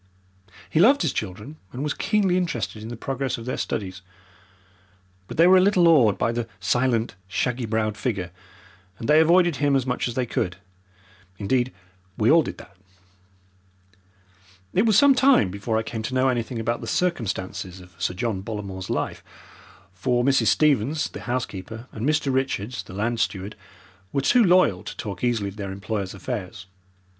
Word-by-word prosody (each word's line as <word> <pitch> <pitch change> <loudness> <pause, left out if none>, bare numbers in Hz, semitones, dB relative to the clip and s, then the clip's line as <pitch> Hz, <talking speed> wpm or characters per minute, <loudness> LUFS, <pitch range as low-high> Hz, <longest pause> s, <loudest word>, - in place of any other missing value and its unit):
He 125 - 0
loved 250 +6 +5
his 160 - 0
children, 105 +9 -5
and 130 +3 -5
was 150 - -1
keenly 200 -4 +1
interested 145 -11 -2
in 110 - -7
the 120 - -6
progress 135 +2 -3
of 115 - -9
their 125 - -2
studies, 95 -3 -4 1.3
but - - -8
they 165 - +6
were 185 +1 +7
a - - +6
little 185 -3 +4
awed 125 -12 +5
by 115 - +1
the 120 -1 -3
silent, 120 +2 +1
shaggy 125 +4 -1
browed 110 -1 0
figure, 100 -8 -3 0.7
and 115 - -6
they 150 +1 +6
avoided 170 0 +4
him 145 -1 +2
as 130 -2 +1
much 125 -1 -1
as 120 - -5
they 130 - 0
could. 90 -6 -2 0.8
Indeed, 120 +5 0 0.5
we 110 +4 +3
all 165 +1 +7
did - - -6
that. 100 - -14 2.0
It 200 +5 +3
was 215 -3 +5
some 280 +3 +7
time 260 - +4
before 110 +3 -2
I 110 - 0
came 110 0 -5
to 120 +4 -4
know 130 +1 +3
anything 120 0 -2
about 115 +1 -2
the - - -6
circumstances 95 - -2
of 90 0 -15
Sir 90 - -1
John 100 -1 -2
Bollamore's 100 -3 -6
life, - - -2 0.7
for 120 +7 0
Mrs. 135 +1 +3
Stevens, 150 0 +2
the - - -9
housekeeper, 115 -2 -4
and 115 +6 -2
Mr. 150 -3 +1
Richards, 130 -3 -1
the - - -12
land 115 +3 -1
steward, 100 0 -2 0.6
were 140 - 0
too 240 - +4
loyal 175 - +4
to - - -8
talk 100 -2 -6
easily 115 -5 0
of 100 - -12
their 100 -2 -5
employer's 100 0 -4
affairs. 100 -3 -6
120 Hz, 175 wpm, -24 LUFS, 105-145 Hz, 2.0 s, were